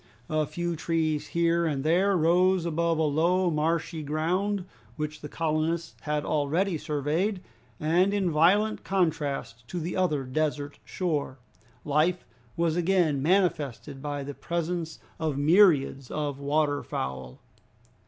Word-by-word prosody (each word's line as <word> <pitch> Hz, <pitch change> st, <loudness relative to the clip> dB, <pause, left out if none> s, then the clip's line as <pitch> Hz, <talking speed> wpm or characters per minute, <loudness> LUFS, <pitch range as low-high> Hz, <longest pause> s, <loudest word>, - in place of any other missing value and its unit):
A 155 Hz, -1 st, +1 dB
few 175 Hz, +2 st, -3 dB
trees 160 Hz, -1 st, -1 dB
here 170 Hz, 0 st, +1 dB
and 140 Hz, -3 st, -1 dB
there 185 Hz, +5 st, +3 dB
rose 180 Hz, +2 st, +3 dB
above 170 Hz, 0 st, 0 dB
a 160 Hz, -, +2 dB
low, 170 Hz, +4 st, +2 dB
marshy 160 Hz, +1 st, -1 dB
ground, 180 Hz, +6 st, -1 dB, 0.3 s
which 150 Hz, +1 st, -4 dB
the 150 Hz, -, -7 dB
colonists 165 Hz, +1 st, -1 dB
had 150 Hz, 0 st, -2 dB
already 165 Hz, +6 st, +1 dB
surveyed, 155 Hz, +8 st, -1 dB, 0.4 s
and 175 Hz, +5 st, +3 dB
in 195 Hz, -4 st, +1 dB
violent 195 Hz, +8 st, +3 dB
contrast 150 Hz, -10 st, -1 dB
to 180 Hz, -, -4 dB
the 170 Hz, +2 st, -4 dB
other 165 Hz, -7 st, +1 dB
desert 145 Hz, +1 st, -2 dB
shore, 150 Hz, -7 st, -2 dB, 0.5 s
life 155 Hz, +5 st, +1 dB, 0.3 s
was 165 Hz, -1 st, +1 dB
again 175 Hz, -5 st, +2 dB
manifested 150 Hz, -, 0 dB
by 145 Hz, -1 st, -3 dB
the 145 Hz, +1 st, -6 dB
presence 170 Hz, 0 st, -3 dB, 0.2 s
of 155 Hz, -4 st, -1 dB
myriads 145 Hz, -5 st, +4 dB
of 145 Hz, -2 st, -3 dB
water 145 Hz, 0 st, +1 dB
fowl. 65 Hz, -1 st, -5 dB
160 Hz, 130 wpm, -27 LUFS, 145-175 Hz, 0.5 s, myriads